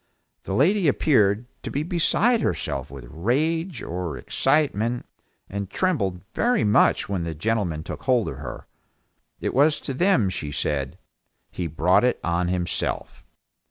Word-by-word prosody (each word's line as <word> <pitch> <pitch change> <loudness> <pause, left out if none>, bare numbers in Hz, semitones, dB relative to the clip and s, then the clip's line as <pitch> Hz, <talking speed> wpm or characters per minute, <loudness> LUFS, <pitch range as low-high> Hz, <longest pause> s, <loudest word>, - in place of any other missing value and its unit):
The 95 - -2
lady 180 - +3
appeared 115 -6 +3 0.2
to - - -5
be 145 - -1
beside 190 +8 +2
herself 70 0 -2
with 70 -2 -9
rage 150 - -1
or 90 -1 -4
excitement, 125 -5 0 0.4
and 100 -1 -5
trembled 100 - 0
very 245 - +2
much 105 +1 +3
when 100 -3 -2
the 85 -1 -4
gentlemen 90 -4 -1
took - - -7
hold 125 -7 +3
of 70 - -7
her; 70 - -7 0.8
it - - -2
was 145 +3 +4
to 135 - -4
them 130 - +3
she 75 -5 -4
said, 70 -2 -2 0.5
"He 90 - -3
brought 80 +7 +3
it 125 - +2
on 85 +1 0
himself." 90 -1 -2
105 Hz, 145 wpm, -24 LUFS, -, 0.8 s, was